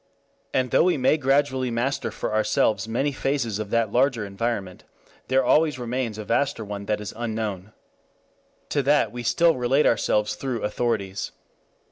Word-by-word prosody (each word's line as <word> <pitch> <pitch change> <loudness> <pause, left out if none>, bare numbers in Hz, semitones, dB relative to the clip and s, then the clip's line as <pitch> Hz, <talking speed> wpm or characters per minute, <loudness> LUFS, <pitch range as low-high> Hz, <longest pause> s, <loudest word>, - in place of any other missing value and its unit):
And 130 -2 0
though - - +4
we 180 -3 +2
may 130 +3 +3
gradually 135 -2 +1
master 120 +4 -1
for - - -4
ourselves 110 -1 +1
many 130 +6 0
phases 130 -6 -1
of 105 -2 -4
that 115 -2 +1
larger 125 -3 +2
environment, 100 -2 -3 0.4
there 130 0 +2
always 150 0 +3
remains 120 -2 -3
a 110 - -6
vaster 140 -1 0
one 100 -1 -6
that 105 -1 0
is 105 - -6
unknown. 110 -4 -4 1.0
To 145 - +1
that 145 +2 +2
we 120 - -6
still 130 +7 +3
relate 130 +4 +2
ourselves 105 -1 +2
through 120 +1 -4
authorities. 105 -3 -2
120 Hz, 155 wpm, -24 LUFS, 105-135 Hz, 1.0 s, though